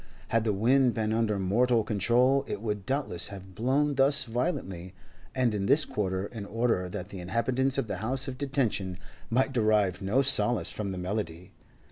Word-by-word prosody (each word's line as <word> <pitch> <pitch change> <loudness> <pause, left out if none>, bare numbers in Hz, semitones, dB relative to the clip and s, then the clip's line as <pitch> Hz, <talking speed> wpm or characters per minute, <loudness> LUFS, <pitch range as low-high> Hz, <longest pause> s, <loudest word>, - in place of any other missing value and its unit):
Had 115 0 +1
the 110 - +2
wind 120 +5 +3
been 110 -1 -1
under 110 -2 0
mortal 115 +5 +2
control 120 +6 +2
it 105 - -4
would 105 -1 -4
doubtless 130 -11 -1
have 95 -1 -10
blown 135 +7 +1
thus 140 +1 +4
violently 105 - -4 0.4
and 125 -4 +1
in 100 -1 -2
this 150 +5 +4
quarter 95 -2 -2
in 110 0 -7
order 110 -3 -1
that 90 +2 -6
the 95 - -8
inhabitants 125 +8 0
of 135 - 0
the 105 - -4
House 125 +7 0
of 130 -1 -6
Detention 120 -10 -1 0.3
might 130 +3 +1
derive 105 -5 +2
no 105 +8 +1
solace 120 -3 +4
from 100 -2 -4
the 95 - -5
melody. 90 -2 -4
110 Hz, 175 wpm, -28 LUFS, 100-130 Hz, 0.4 s, thus